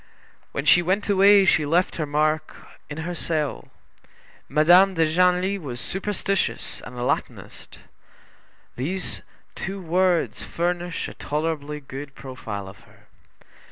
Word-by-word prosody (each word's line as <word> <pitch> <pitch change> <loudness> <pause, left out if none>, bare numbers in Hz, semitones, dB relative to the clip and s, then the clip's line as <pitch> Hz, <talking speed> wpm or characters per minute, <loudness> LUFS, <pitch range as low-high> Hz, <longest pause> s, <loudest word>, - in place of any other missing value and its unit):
When 140 - -3
she 175 - +6
went 190 +4 0
away 200 0 +6
she 160 -4 +4
left 170 +5 +1
her 155 -3 -2
mark 155 +2 0 0.3
in 145 - -6
her 175 - -3
cell. 155 -4 -2 0.8
Madame 175 +6 +5
de 165 -1 +3
Genlis 180 +4 +2
was 130 -7 -6
superstitious 195 - -2
and 125 - -10
a 120 - -3
Latinist. - - -4 1.0
These 180 +9 -2 0.3
two 195 +2 -5
words 180 0 +1
furnish 175 0 -2
a - - -9
tolerably 150 -1 -3
good 135 0 -8
profile 120 -7 -7
of 95 +1 -12
her. - - -22
165 Hz, 125 wpm, -24 LUFS, 145-185 Hz, 1.0 s, she